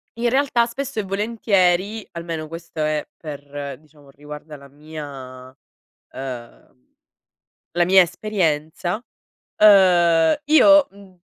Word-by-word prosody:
in 235 +1 0
realtà, 260 -2 +2
spesso 270 0 -5
e - - -1
volentieri 200 -1 0
almeno 165 -2 -5
questo 165 -1 -7
è 155 -1 -2
per 145 -3 -8
diciamo, 150 -2 -22
riguarda 150 +2 -11
la 140 0 -15
mia 135 -4 -10 0.6
uhm 125 - -9 1.0
la 175 - +4
mia 190 +1 +6
esperienza. 175 +1 -2 0.5
Uhm, 175 -6 +5
io, 295 -1 +6
mhmm, 195 -2 -18
170 Hz, 105 wpm, -21 LUFS, 150-205 Hz, 1.0 s, mia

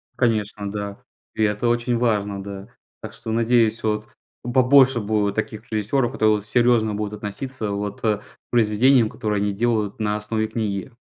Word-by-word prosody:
Конечно, 105 -4 -1
да. 100 -1 -5 0.4
И 110 - +1
это 105 +2 +1
очень 120 0 +1
важно, 105 -4 0
да. 100 0 -8 0.3
Так - - -8
что 110 - -7
надеюсь, 115 0 +2
вот, 105 -1 -1 0.4
побольше 130 +1 +5
будет 105 -1 0
таких 110 +1 -4
режиссёров, 115 +4 0
которые 110 -1 +2
серьёзно 120 -1 +2
будут 105 0 -3
относиться, 105 +2 -5
вот, 100 0 -4
э, 110 -2 +2
к 105 - -17 0.3
произведениям, 120 +1 +4
которые 105 -4 -2
они 100 0 0
делают 110 -1 0
на 105 -1 0
основе 110 +1 -2
книги. 110 0 -3
110 Hz, 155 wpm, -22 LUFS, 105-120 Hz, 0.4 s, побольше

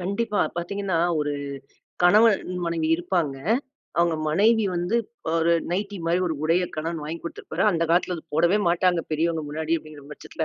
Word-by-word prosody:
கண்டிப்பா. 205 +3 -1 0.2
பாத்தீங்கன்னா 190 0 -2 0.2
ஒரு 145 0 -1 0.7
கணவன் 205 0 +4
மனைவி 165 -2 -1
இருப்பாங்க. 170 -5 -1 0.6
அவுங்க 170 -1 +3
மனைவி 215 +7 +3
வந்து 175 +6 0 0.4
ஒரு 165 0 +3 0.2
நைட்டி 200 +3 -2
மாரி 175 +2 +2
ஒரு 165 - -1
உடைய 170 +3 +2
கணவன் 165 +1 -3
வாங்கி 160 +3 -5
குடுத்திருப்பாரு. 170 0 -4
அந்த 170 -3 0
காலத்துல 180 +1 +2
அத 160 - -9
போடவே 170 +6 +3
மாட்டாங்க. 175 0 +2
பெரியவங்க 160 +1 0
முன்னாடி 160 +2 -1
அப்டிங்கிற 155 -2 -13
பட்சத்துல. 160 +2 -5
170 Hz, 150 wpm, -24 LUFS, 160-185 Hz, 0.7 s, கணவன்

